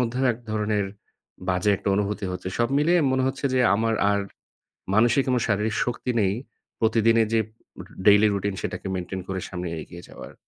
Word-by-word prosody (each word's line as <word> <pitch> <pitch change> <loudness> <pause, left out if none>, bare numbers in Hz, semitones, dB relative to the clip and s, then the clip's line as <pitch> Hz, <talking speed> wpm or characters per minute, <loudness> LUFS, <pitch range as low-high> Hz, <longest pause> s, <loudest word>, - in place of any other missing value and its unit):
মধ্যেও 125 +2 0
এক 115 - -10
ধরনের 105 -2 0 0.6
বাজে 90 +3 +2
একটা - - -4
অনুভূতি 105 0 -1
হচ্ছে। 90 0 -5
সব 120 - +2
মিলিয়ে 170 +4 +3
মনে 130 - +1
হচ্ছে 135 +2 -3
যে, 130 - +3
আমার 115 +2 +1 0.2
আর 100 - +2 0.8
মানসিক 120 +5 +4
এবং 125 -1 +2
শারীরিক 105 +1 0
শক্তি 120 +1 -3
নেই। 95 0 +2 0.5
প্রতিদিনের 115 0 +3
যে, 110 - +4
ডে 110 - -15 0.5
ডেইলি 105 +1 +7
রুটিন 100 0 -2
সেটাকে - - -5
মেইনটেইন 95 +1 -4
করে 95 -1 -3
সামনে 90 -1 -4
এগিয়ে 85 +2 -11
যাওয়ার। - - -11
105 Hz, 170 wpm, -25 LUFS, 100-115 Hz, 0.8 s, ডেইলি